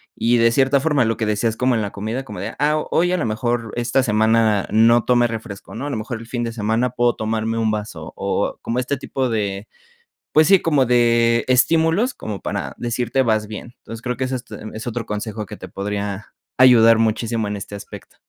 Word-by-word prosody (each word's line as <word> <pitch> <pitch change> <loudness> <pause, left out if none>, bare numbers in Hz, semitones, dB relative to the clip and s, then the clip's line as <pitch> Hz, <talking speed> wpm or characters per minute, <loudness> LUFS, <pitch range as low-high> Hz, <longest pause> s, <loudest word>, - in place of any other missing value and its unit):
y 120 +1 +2
de 115 0 +4
cierta 135 +3 +3
forma, 145 -3 +2
lo 115 0 -1
que 110 - -1
decías 110 +1 0
como 125 0 +2
en 115 - +1
la 100 -2 -3
comida, 110 +6 -4
como 105 -6 -9
de: 110 +3 -5
"Ah, 150 +1 +2
hoy 175 +2 +2
a - - +1
lo 160 - -1
mejor 115 0 -2
esta 120 +2 +1
semana 110 -2 +2
no 115 +2 +4
tomé 120 -1 +3
refresco, 110 -3 -6
¿no?, 135 +6 -5
a - - -3
lo 140 - -3
mejor 115 +2 -5
el 115 - -11
fin 120 0 -3
de 115 - -3
semana 115 +3 0
puedo 120 0 +1
tomarme 110 +1 -2
un 110 -1 +1
vaso, 105 -7 -5
o - - -2
o - - -10
como 115 - -3
este 130 +3 -1
tipo 130 0 -2
de, 100 -2 -2 0.6
pues 155 +1 +5
sí, 195 -2 +6
como 145 -5 +2
de 115 -1 +3
estímulos 165 - +3
como 105 -3 -6
para - - -4
decirte 120 +2 -1
vas 110 -4 +1
bien". 110 +3 -8
Entonces, 115 0 -9
creo 125 +1 -3
que 130 - -3
es, 130 - -5
este, 125 -2 -6
es 110 +2 -7
otro 120 -1 -3
consejo 105 +1 -4
que - - -10
te 95 - -9
podría 100 +1 -5 0.2
ayudar 115 -3 +7
muchísimo 115 0 0
en 105 - -3
este 100 +1 -8
aspecto. 100 - -11
115 Hz, 220 wpm, -20 LUFS, 110-125 Hz, 0.6 s, ayudar